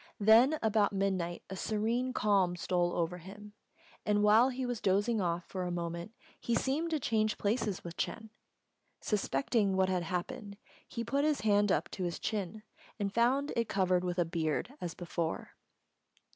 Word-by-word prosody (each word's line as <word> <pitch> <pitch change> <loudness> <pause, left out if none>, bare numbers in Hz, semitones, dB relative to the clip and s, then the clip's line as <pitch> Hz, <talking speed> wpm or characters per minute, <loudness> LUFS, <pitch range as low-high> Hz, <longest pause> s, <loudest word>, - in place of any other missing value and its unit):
Then 230 +8 +6
about 215 -2 +2
midnight 190 -3 -1
a 190 - -6
serene 225 +6 -1
calm 200 -6 +2
stole 175 0 0
over 175 +1 -1
him; 205 +4 -11 0.5
and 205 0 +2
while 220 +5 +6
he 260 0 -3
was 245 -3 -3
dozing 205 +3 +2
off 170 -1 -1
for 185 - -5
a 180 - -2
moment, 170 +4 -4 0.2
he 235 - -1
seemed 290 +7 0
to 315 -2 0
change 215 -4 +1
places 210 -2 -1
with 170 -1 -8
Ch'êng. 220 -1 -3 0.7
Suspecting 200 - 0
what 190 0 +2
had 185 -1 +1
happened, 200 +5 -4 0.3
he 230 - -4
put 275 +5 0
his 305 -1 +1
hand 205 -1 +3
up - - +1
to 190 - -4
his 175 -1 -2
chin, 210 0 -3 0.3
and 200 -2 -2
found 260 +5 +2
it 230 -2 0
covered 185 -2 +2
with 180 0 -2
a 175 - +3
beard 165 - -2
as 175 -2 -4
before. 170 -2 -3
205 Hz, 170 wpm, -32 LUFS, 180-230 Hz, 0.7 s, Then